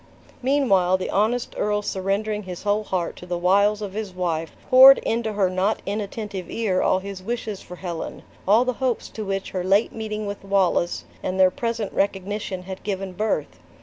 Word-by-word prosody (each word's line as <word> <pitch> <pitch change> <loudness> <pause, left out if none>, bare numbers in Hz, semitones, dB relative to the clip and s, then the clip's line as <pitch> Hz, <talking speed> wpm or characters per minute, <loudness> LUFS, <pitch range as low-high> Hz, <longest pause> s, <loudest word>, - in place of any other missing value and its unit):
Meanwhile, 235 -10 +3
the 185 - -4
honest 225 +4 +1
earl 210 0 0
surrendering 200 +3 -1
his 185 -3 -8
whole 205 +1 +1
heart 180 -4 -2
to 180 - -10
the 175 -1 -2
wiles 200 +4 +3
of 195 -2 -5
his 205 -3 -5
wife, 165 -3 -2
poured 265 +1 +9
into 225 -1 -1
her 200 -2 +2
not 185 +4 0
inattentive 205 -2 -4
ear 200 -5 0
all - - +3
his 195 0 -6
wishes 215 -1 -4
for 180 - -10
Helen: 175 -3 -6 0.2
all 220 +5 +5
the 255 - 0
hopes 255 -3 -1
to 220 - -6
which 195 -1 -3
her 185 -2 -2
late 195 +4 +2
meeting 215 -1 -4
with 200 -1 -6
Wallace, 195 -3 +1 0.2
and 185 +1 -3
their 185 -1 +6
present 230 -2 -3
recognition, 195 -1 -2
had 190 0 -7
given 195 -2 -4
birth. 175 - -2
200 Hz, 180 wpm, -23 LUFS, 185-215 Hz, 0.2 s, poured